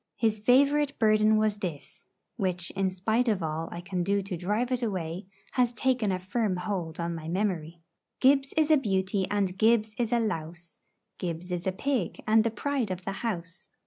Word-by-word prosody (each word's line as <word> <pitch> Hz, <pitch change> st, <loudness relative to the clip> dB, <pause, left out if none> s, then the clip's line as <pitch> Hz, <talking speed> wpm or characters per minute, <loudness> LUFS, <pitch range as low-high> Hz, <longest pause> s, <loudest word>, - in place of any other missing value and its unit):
His 220 Hz, -2 st, +1 dB
favourite 280 Hz, +5 st, +3 dB
burden 215 Hz, -1 st, +4 dB
was 215 Hz, -1 st, +1 dB
this 165 Hz, -7 st, -6 dB, 0.3 s
which, 180 Hz, -5 st, -2 dB
in 195 Hz, -1 st, 0 dB
spite 220 Hz, +7 st, 0 dB
of 210 Hz, -5 st, +1 dB
all 160 Hz, +1 st, -3 dB
I 170 Hz, -, -6 dB
can 180 Hz, 0 st, -3 dB
do 200 Hz, +2 st, +1 dB
to 190 Hz, -1 st, -4 dB
drive 210 Hz, +8 st, -1 dB
it 250 Hz, -1 st, +1 dB
away, 185 Hz, -4 st, -3 dB, 0.2 s
has 245 Hz, -2 st, +2 dB
taken 245 Hz, -3 st, +1 dB
a 185 Hz, -, 0 dB
firm 195 Hz, +2 st, -1 dB
hold 180 Hz, -3 st, -3 dB
on 170 Hz, 0 st, -2 dB
my 160 Hz, -1 st, -6 dB
memory: 170 Hz, -3 st, -2 dB, 0.4 s
Gibbs 270 Hz, +1 st, +4 dB
is 310 Hz, 0 st, +3 dB
a 310 Hz, -, +7 dB
beauty, 190 Hz, -5 st, 0 dB
and 195 Hz, -3 st, 0 dB
Gibbs 220 Hz, -1 st, +3 dB
is 235 Hz, -2 st, 0 dB
a 240 Hz, -, +3 dB
louse; 170 Hz, -5 st, -4 dB, 0.4 s
Gibbs 175 Hz, 0 st, -4 dB
is 175 Hz, +1 st, -2 dB
a -, -, +2 dB
pig, 230 Hz, -1 st, -2 dB
and 220 Hz, 0 st, +5 dB
the 230 Hz, -, +1 dB
pride 245 Hz, +1 st, -2 dB
of 185 Hz, 0 st, -5 dB
the 195 Hz, -, -1 dB
house. 175 Hz, -6 st, -4 dB
200 Hz, 190 wpm, -28 LUFS, 180-230 Hz, 0.4 s, a